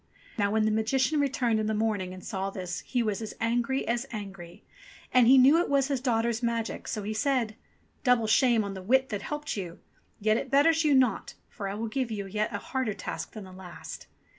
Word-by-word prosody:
Now 205 Hz, -3 st, +1 dB
when 215 Hz, +1 st, +2 dB
the 215 Hz, -, +2 dB
Magician 255 Hz, +7 st, +1 dB
returned 250 Hz, -5 st, +1 dB
in 215 Hz, -, -1 dB
the 220 Hz, -, 0 dB
morning 210 Hz, -4 st, -1 dB
and 185 Hz, 0 st, -10 dB
saw 195 Hz, 0 st, -3 dB
this 185 Hz, -2 st, -5 dB
he 245 Hz, -2 st, -1 dB
was 215 Hz, -1 st, -2 dB
as 220 Hz, -, -6 dB
angry 240 Hz, +3 st, 0 dB
as 240 Hz, +3 st, -1 dB
angry. 195 Hz, -6 st, -8 dB, 0.5 s
And 250 Hz, -2 st, +6 dB
he 265 Hz, +2 st, +8 dB
knew 275 Hz, +6 st, +7 dB
it -, -, -2 dB
was 280 Hz, 0 st, +2 dB
his 275 Hz, -3 st, -1 dB
daughter's 235 Hz, -2 st, 0 dB
magic, 230 Hz, -1 st, -2 dB
so 215 Hz, -, -3 dB
he 215 Hz, +2 st, -3 dB
said: 235 Hz, -2 st, 0 dB, 0.5 s
"Double 250 Hz, -3 st, +3 dB
shame 230 Hz, 0 st, +4 dB
on 200 Hz, -1 st, -4 dB
the 190 Hz, -, -7 dB
wit 260 Hz, +7 st, +2 dB
that 205 Hz, -2 st, -3 dB
helped 295 Hz, 0 st, -4 dB
you! 180 Hz, -4 st, -5 dB, 0.4 s
Yet 215 Hz, +1 st, +2 dB
it -, -, -4 dB
betters 320 Hz, +4 st, +4 dB
you 295 Hz, -2 st, +4 dB
not, 255 Hz, -6 st, +1 dB
for 200 Hz, -, -6 dB
I 195 Hz, -, -4 dB
will 225 Hz, +2 st, -3 dB
give 255 Hz, +2 st, -2 dB
you 205 Hz, -3 st, -4 dB
a -, -, -9 dB
yet 215 Hz, +1 st, 0 dB
harder 215 Hz, +1 st, -2 dB
task -, -, -6 dB
than 215 Hz, -, -7 dB
the 190 Hz, -, -11 dB
last. 185 Hz, -2 st, -9 dB
225 Hz, 220 wpm, -28 LUFS, 205-260 Hz, 0.5 s, he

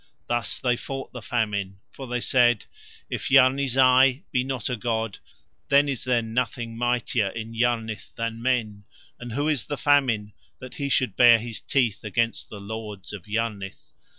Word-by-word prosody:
Thus 120 Hz, -6 st, -2 dB
they 125 Hz, -1 st, +1 dB
fought 135 Hz, +2 st, -6 dB
the 125 Hz, -, -7 dB
Famine, 100 Hz, -5 st, -2 dB
for 135 Hz, -, -9 dB
they 125 Hz, 0 st, -2 dB
said: 120 Hz, -3 st, +3 dB, 0.4 s
"If -, -, -4 dB
Yarni 135 Hz, +2 st, +5 dB
Zai 130 Hz, +2 st, +4 dB
be 125 Hz, -, +1 dB
not 130 Hz, -4 st, -3 dB
a 125 Hz, -, -1 dB
god, 115 Hz, -2 st, -2 dB, 0.5 s
then 140 Hz, +1 st, +5 dB
is 135 Hz, -4 st, -3 dB
there 125 Hz, -2 st, +2 dB
nothing 115 Hz, 0 st, -2 dB
mightier 120 Hz, -2 st, 0 dB
in 115 Hz, +2 st, -7 dB
Yarnith 115 Hz, -2 st, -1 dB
than 115 Hz, 0 st, -4 dB
men, 110 Hz, -5 st, -1 dB, 0.3 s
and 120 Hz, -2 st, -7 dB
who 145 Hz, +5 st, 0 dB
is 145 Hz, -7 st, 0 dB
the 145 Hz, -, -4 dB
Famine 125 Hz, -7 st, +2 dB, 0.2 s
that 130 Hz, -1 st, -10 dB
he 140 Hz, -1 st, -3 dB
should 130 Hz, -6 st, +1 dB
bare 120 Hz, -1 st, +7 dB
his 115 Hz, 0 st, -6 dB
teeth 120 Hz, -7 st, 0 dB
against 115 Hz, +2 st, -1 dB
the 105 Hz, -, -8 dB
lords 105 Hz, -1 st, -7 dB
of 100 Hz, -3 st, -9 dB
Yarnith?" 105 Hz, -3 st, -4 dB
120 Hz, 170 wpm, -25 LUFS, 110-130 Hz, 0.5 s, bare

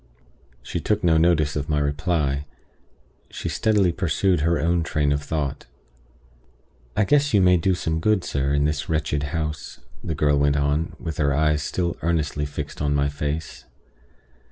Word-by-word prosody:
She -, -, -4 dB
took 105 Hz, -1 st, -1 dB
no 80 Hz, -2 st, +4 dB
notice 80 Hz, -3 st, +2 dB
of 75 Hz, 0 st, -3 dB
my 75 Hz, -, +1 dB
reply; 75 Hz, -1 st, -1 dB, 0.8 s
she -, -, -6 dB
steadily 105 Hz, -5 st, +2 dB
pursued 90 Hz, +1 st, +1 dB
her 85 Hz, +1 st, +1 dB
own 85 Hz, +3 st, +1 dB
train 75 Hz, -3 st, 0 dB
of 70 Hz, 0 st, 0 dB
thought. 75 Hz, -2 st, -3 dB, 1.3 s
"I 105 Hz, -, +4 dB
guess 145 Hz, +3 st, +2 dB
you -, -, +6 dB
may 90 Hz, -1 st, +5 dB
do 90 Hz, +2 st, +1 dB
some 80 Hz, -2 st, -2 dB
good, 105 Hz, +1 st, +2 dB
sir, 70 Hz, 0 st, -1 dB
in 70 Hz, 0 st, +2 dB
this 75 Hz, -1 st, -2 dB
wretched 75 Hz, -2 st, 0 dB
house," 75 Hz, -1 st, -4 dB, 0.2 s
the 80 Hz, -, -3 dB
girl 75 Hz, -1 st, +2 dB
went 70 Hz, 0 st, +2 dB
on, 70 Hz, +3 st, 0 dB
with 80 Hz, -3 st, -5 dB
her 70 Hz, -2 st, +1 dB
eyes 75 Hz, 0 st, +2 dB
still 85 Hz, +3 st, -2 dB
earnestly 75 Hz, -3 st, -1 dB
fixed 70 Hz, -, -6 dB
on 75 Hz, -1 st, +1 dB
my 70 Hz, 0 st, +1 dB
face. 75 Hz, 0 st, -4 dB
75 Hz, 165 wpm, -23 LUFS, 75-85 Hz, 1.3 s, you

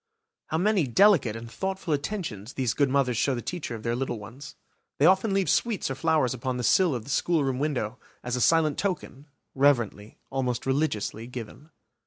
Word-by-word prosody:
How 160 Hz, -, -1 dB
many 190 Hz, -3 st, +2 dB
delicate 150 Hz, -, +4 dB
and 115 Hz, +1 st, -7 dB
thoughtful 190 Hz, -2 st, -3 dB
attentions 140 Hz, -, -4 dB
these 125 Hz, -4 st, 0 dB
good 140 Hz, -1 st, +2 dB
mothers 130 Hz, -3 st, +1 dB
show 135 Hz, +3 st, +1 dB
the 120 Hz, -, -4 dB
teacher 165 Hz, -9 st, -4 dB
of 110 Hz, -, -9 dB
their 115 Hz, 0 st, 0 dB
little 125 Hz, -1 st, -2 dB
ones! 115 Hz, +7 st, -10 dB, 0.4 s
They 145 Hz, -, +3 dB
often 190 Hz, +4 st, +4 dB
leave 195 Hz, -1 st, +1 dB
sweets 220 Hz, -, 0 dB
or -, -, 0 dB
flowers 155 Hz, -3 st, +1 dB
upon 125 Hz, 0 st, -3 dB
the 125 Hz, -, -3 dB
sill 170 Hz, -, +3 dB
of 120 Hz, -, -4 dB
the 135 Hz, -, -7 dB
schoolroom 140 Hz, -5 st, +1 dB
window, 125 Hz, -6 st, -2 dB, 0.2 s
as 125 Hz, 0 st, -2 dB
a 125 Hz, -, -1 dB
silent 160 Hz, -1 st, +3 dB
token, 175 Hz, -7 st, -3 dB, 0.3 s
reverently, 120 Hz, -7 st, +1 dB
almost 125 Hz, -3 st, -2 dB
religiously, 130 Hz, -5 st, -1 dB
given. 125 Hz, +5 st, -9 dB
135 Hz, 185 wpm, -27 LUFS, 120-165 Hz, 0.4 s, delicate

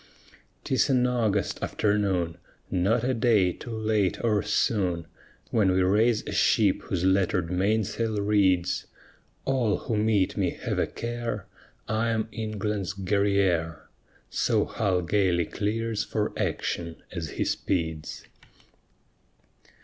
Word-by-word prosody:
'Tis 130 Hz, -, +1 dB
an 125 Hz, -2 st, +3 dB
August 110 Hz, -6 st, 0 dB
afternoon 95 Hz, -6 st, 0 dB, 0.3 s
Not 100 Hz, +6 st, +2 dB
a 130 Hz, +1 st, +1 dB
day 110 Hz, -7 st, +3 dB
too -, -, -10 dB
late 110 Hz, -4 st, +1 dB
or 105 Hz, -3 st, +2 dB
soon, 95 Hz, -5 st, 0 dB, 0.5 s
When 105 Hz, -4 st, +3 dB
we 95 Hz, 0 st, +3 dB
raise 105 Hz, +4 st, +3 dB
a -, -, -5 dB
ship 100 Hz, -4 st, +3 dB
whose 90 Hz, -3 st, -3 dB
lettered 95 Hz, -2 st, +2 dB
mainsail 110 Hz, +3 st, 0 dB
reads: 95 Hz, -3 st, +2 dB, 0.6 s
All 125 Hz, -6 st, +1 dB
who 115 Hz, -, -3 dB
meet 105 Hz, -3 st, +2 dB
me -, -, -1 dB
have -, -, -1 dB
a -, -, +1 dB
care, 115 Hz, -3 st, -4 dB, 0.4 s
I 110 Hz, +2 st, 0 dB
am 110 Hz, -1 st, -1 dB
England's 105 Hz, -3 st, -3 dB
Guerrière; 95 Hz, -4 st, +1 dB, 0.5 s
So -, -, +2 dB
Hull 90 Hz, -2 st, 0 dB
gayly 90 Hz, -2 st, +2 dB
clears 110 Hz, +3 st, -2 dB
for 105 Hz, -2 st, -2 dB
action 85 Hz, -2 st, -3 dB
as -, -, -4 dB
he -, -, +1 dB
speeds. 80 Hz, -4 st, -2 dB
105 Hz, 120 wpm, -27 LUFS, 95-110 Hz, 0.6 s, an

